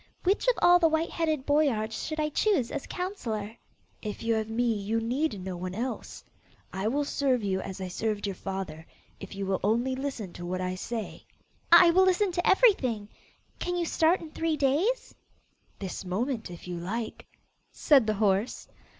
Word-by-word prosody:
Which 390 +6 +1
of - - +5
all 355 0 +7
the 335 - +5
white 320 +1 0
headed 310 -5 -1
boyards 260 -7 +1
shall 310 0 -4
I 305 0 +1
choose 305 - +1
as 290 - -4
counsellor?' 230 - -4 0.5
'If 210 0 -5
you 230 0 +2
have 220 -1 -1
me, 235 +1 +1
you 215 +2 -1
need 240 0 -1
no 185 0 -5
one 180 +1 -5
else: 245 +4 -5 0.5
I 190 +2 -2
will 285 +5 0
serve 265 -5 +1
you 190 -1 0
as 190 +1 -7
I 190 - -4
served 210 +3 -2
your 200 - -2
father, 190 -4 -5 0.4
if - - -9
you 195 0 -3
will 190 -1 0
only 235 +6 +1
listen 260 -9 -4
to 175 - -8
what 180 +1 -3
I 185 0 -2
say.' 220 +4 -5 0.5
'I 340 0 +9
will 375 +2 +5
listen 375 +1 +2
to 350 0 0
everything. 260 - +3 0.5
Can 355 0 -2
you 345 - 0
start 330 +2 +2
in 320 -2 -9
three 325 -1 -1
days?' 310 - +1 0.6
'This 190 -1 -5
moment, 220 +5 -2
if 175 0 -10
you 175 -1 -4
like,' 220 +6 -5 0.4
said 275 -8 +4
the 215 - +1
horse. 205 +2 0
235 Hz, 185 wpm, -28 LUFS, 200-315 Hz, 0.6 s, I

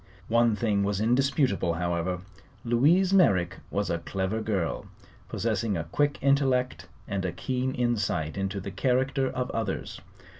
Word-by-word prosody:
One 115 -1 +3
thing 105 -3 +1
was 100 -1 0
indisputable, 125 - +2
however: 85 +1 -1 0.4
Louise 160 +11 +3
Merrick 95 - +3
was 100 -2 -1
a 85 - -1
clever 95 +5 -2
girl, 100 -6 -2 0.4
possessing 110 -1 -1
a 80 - -2
quick 145 - 0
intellect 135 -2 +1 0.2
and 100 -2 -2
a 90 - -1
keen 130 +8 -2
insight 110 -10 0
into 95 0 -2
the 100 +1 -6
character 130 +3 +1
of 125 0 -3
others. 110 -4 -3
110 Hz, 140 wpm, -27 LUFS, 95-130 Hz, 0.4 s, One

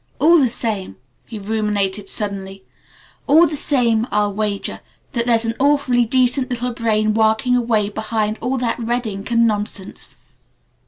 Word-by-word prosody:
All 335 +2 +5
the 260 -4 +3
same 220 -5 -2 0.2
" - - -43
he 225 - -7
ruminated 205 -1 -2
suddenly: 195 -2 -2 0.6
"All 320 +4 +6
the 305 - -2
same 240 -6 +1
I'll 205 0 0
wager 205 -1 -3 0.3
that 235 -1 -2
there's 230 -1 +2
an 225 - -1
awfully 270 -4 +2
decent 255 +2 +1
little 245 0 -3
brain 215 -2 +1
working 220 +3 +2
away 230 -4 +1
behind 215 0 -2
all 255 +3 -1
that 245 -1 -1
red 240 +1 -1
ink 195 -2 -6
and 235 0 +3
nonsense." 205 -3 -3
225 Hz, 155 wpm, -19 LUFS, 210-245 Hz, 0.6 s, All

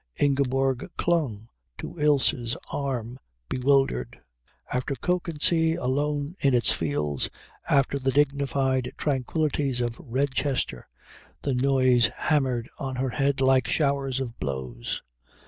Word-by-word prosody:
Ingeborg 135 -2 +1
clung 135 -11 0 0.3
to - - -7
Ilse's 135 -5 +2
arm 130 -3 -3 0.3
bewildered. 130 - +1 0.5
After 125 +3 -1
Kökensee 165 -1 +1
alone 145 +1 -1
in 135 -2 +3
its 120 - +4
fields, 75 -2 -1 0.4
after 140 0 +3
the 135 0 0
dignified 135 -2 +1
tranquillities 140 -1 0
of 120 -1 -2
Redchester, 130 - -1 0.6
the 140 - 0
noise 130 -3 +3
hammered 130 -6 +1
on 135 -3 -3
her 130 +1 -1
head 140 +1 0
like 130 -2 +4
showers 140 -3 +1
of 120 -3 -5
blows. 65 -4 -4
135 Hz, 110 wpm, -26 LUFS, 125-140 Hz, 0.6 s, its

